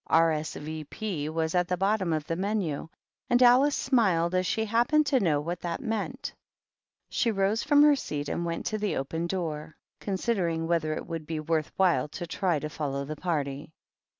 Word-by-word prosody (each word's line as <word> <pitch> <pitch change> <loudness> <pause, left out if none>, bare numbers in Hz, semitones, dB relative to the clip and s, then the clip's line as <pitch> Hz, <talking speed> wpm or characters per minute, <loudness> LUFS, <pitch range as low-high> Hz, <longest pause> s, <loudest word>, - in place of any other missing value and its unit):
R. 165 0 +4
S. 155 -1 -3
V. 155 +1 -5
P. 165 -4 -4
was 160 0 -1
at 180 -1 +2
the 180 -1 -1
bottom 195 -1 +1
of 155 -2 -1
the 165 - -2
MenUj 185 -6 -2 0.4
and 245 +1 +5
Alice 260 +4 +6
smiled, 190 -10 +2
as 185 0 +1
she 220 +4 0
happened 240 +8 +3
to 275 -3 +3
know 160 -8 +2
what 170 +4 -4
that 170 -1 -3
meant. 235 +1 -3 0.8
She 235 - +1
rose 205 +1 +1
from 290 0 +5
her 295 -1 +6
seat 150 - -4
and 170 - -2
went 170 -1 -3
to 215 - -1
the 210 -1 -1
open 160 +5 -2
door, 160 -4 -4 0.2
considering 185 -5 -1
whether 165 -2 0
it - - -5
would 165 -2 -6
be 160 -1 -3
worth 155 0 -1
while 175 -8 +3
to 175 - -6
try 175 0 0
to 150 - -3
follow 140 -2 -3
the 155 +2 -5
party. 145 -3 -3
170 Hz, 195 wpm, -28 LUFS, 155-215 Hz, 0.8 s, Alice